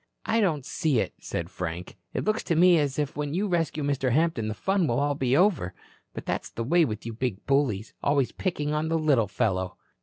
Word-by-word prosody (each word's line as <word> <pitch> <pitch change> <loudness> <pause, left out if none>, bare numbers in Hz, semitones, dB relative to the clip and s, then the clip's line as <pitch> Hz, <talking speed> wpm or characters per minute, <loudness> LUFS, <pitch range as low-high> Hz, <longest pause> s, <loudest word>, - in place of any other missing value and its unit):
"I 225 +1 +2
don't 155 -10 +1
see 150 -5 0
it," - - -1
said 85 +1 -4
Frank. 90 0 -5 0.2
"It - - -2
looks 215 +1 +1
to 170 - +1
me 175 0 +6
as 140 -3 -1
if 145 -2 -1
when 150 +1 -2
you 205 +3 0
rescue 165 -4 0
Mr. 135 -3 0
Hampton 150 -5 +1
the 110 - -3
fun 190 - +1
will 120 0 +1
all 145 0 +1
be 135 -1 +1
over. 160 - +2 0.4
But - - -6
that's - - -2
the 115 - -4
way 170 +8 +4
with 110 -4 -5
you 115 - -4
big 115 -4 -3
bullies. 130 -7 +1
Always 140 -3 +2
picking 150 -5 -2
on 155 +1 0
the 165 - +2
little 145 -9 +3
fellow." 95 -4 -1
145 Hz, 220 wpm, -27 LUFS, 115-165 Hz, 0.4 s, me